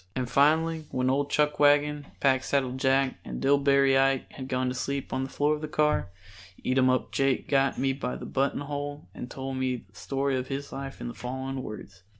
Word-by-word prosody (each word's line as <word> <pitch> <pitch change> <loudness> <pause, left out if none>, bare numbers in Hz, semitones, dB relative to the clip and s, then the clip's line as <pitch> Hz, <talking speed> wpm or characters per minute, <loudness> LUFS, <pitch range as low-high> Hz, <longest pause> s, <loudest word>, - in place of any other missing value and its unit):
And 130 -1 -1
finally 155 +4 +3
when 130 0 +1
old 140 +1 0
Chuckwagon, 150 0 +3
Packsaddle 130 -1 +1
Jack 135 0 +2
and - - -6
Dillbery 140 0 +4
Ike 135 -1 +1
had 130 -1 -7
gone 130 -1 0
to - - -2
sleep 140 +2 -3
on 130 0 0
the 135 - -4
floor 145 +2 +1
of 150 - -4
the 155 - -3
car, 150 -8 +1 0.6
Eatumup 130 0 +2
Jake 135 -1 +1
got 135 -1 +2
me 135 +1 +1
by 65 - -4
the 65 - -7
button 135 +1 0
hole 145 +1 -5
and 125 - -7
told 135 0 -5
me 130 -2 -2
the 95 - -29
story 135 0 -1
of 130 0 -2
his 140 +1 -5
life 135 0 -7
in - - -4
the 120 - -5
following 130 +2 -4
words. 100 -4 -9
135 Hz, 195 wpm, -28 LUFS, 130-145 Hz, 0.6 s, Dillbery